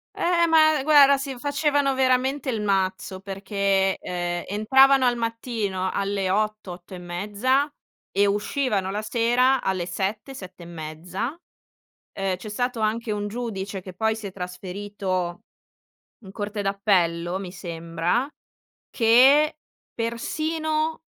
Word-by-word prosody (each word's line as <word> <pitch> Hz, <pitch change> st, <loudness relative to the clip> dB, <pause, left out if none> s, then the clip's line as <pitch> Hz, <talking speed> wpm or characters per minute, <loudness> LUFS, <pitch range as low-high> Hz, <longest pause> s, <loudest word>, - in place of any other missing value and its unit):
Eh, 340 Hz, -1 st, +2 dB
ma 310 Hz, -2 st, +5 dB
guarda, 280 Hz, -2 st, +7 dB
si 275 Hz, -2 st, -5 dB
facevano 285 Hz, 0 st, +1 dB
veramente 260 Hz, +1 st, +1 dB
il 220 Hz, -3 st, -1 dB
mazzo, 190 Hz, -1 st, -1 dB
perché, 195 Hz, 0 st, 0 dB
ehm, 175 Hz, -1 st, -3 dB
entravano 265 Hz, +6 st, +5 dB
al 245 Hz, -1 st, +3 dB
mattino 230 Hz, -5 st, -2 dB
alle 195 Hz, -1 st, -1 dB
8, 215 Hz, -1 st, -1 dB
8 175 Hz, +1 st, -10 dB
e -, -, -7 dB
mezza, 205 Hz, +11 st, 0 dB, 0.4 s
e 200 Hz, +1 st, +3 dB
uscivano 205 Hz, 0 st, 0 dB
la 205 Hz, +2 st, -3 dB
sera 245 Hz, +4 st, +2 dB
alle 185 Hz, -2 st, -1 dB
7, 195 Hz, +9 st, -3 dB
7 185 Hz, -7 st, -10 dB
e -, -, -10 dB
mezza. 170 Hz, +5 st, -5 dB, 0.9 s
Uhm, 195 Hz, -1 st, 0 dB
c'è 200 Hz, +4 st, -9 dB
stato 245 Hz, +2 st, -2 dB
anche 220 Hz, +1 st, -1 dB
un 205 Hz, 0 st, -2 dB
giudice, 205 Hz, -4 st, -4 dB
che 185 Hz, 0 st, -10 dB
poi 220 Hz, +3 st, 0 dB
si 220 Hz, -2 st, -7 dB
è 195 Hz, -, -7 dB
trasferito 185 Hz, 0 st, -4 dB, 0.8 s
in 190 Hz, -, -10 dB
Corte 205 Hz, +1 st, -4 dB
d'Appello, 185 Hz, -3 st, +1 dB
mi 190 Hz, -2 st, -6 dB
sembra, 170 Hz, -, -2 dB, 0.6 s
che 265 Hz, +7 st, +5 dB, 0.4 s
persino 310 Hz, +7 st, -2 dB
210 Hz, 130 wpm, -24 LUFS, 190-255 Hz, 0.9 s, guarda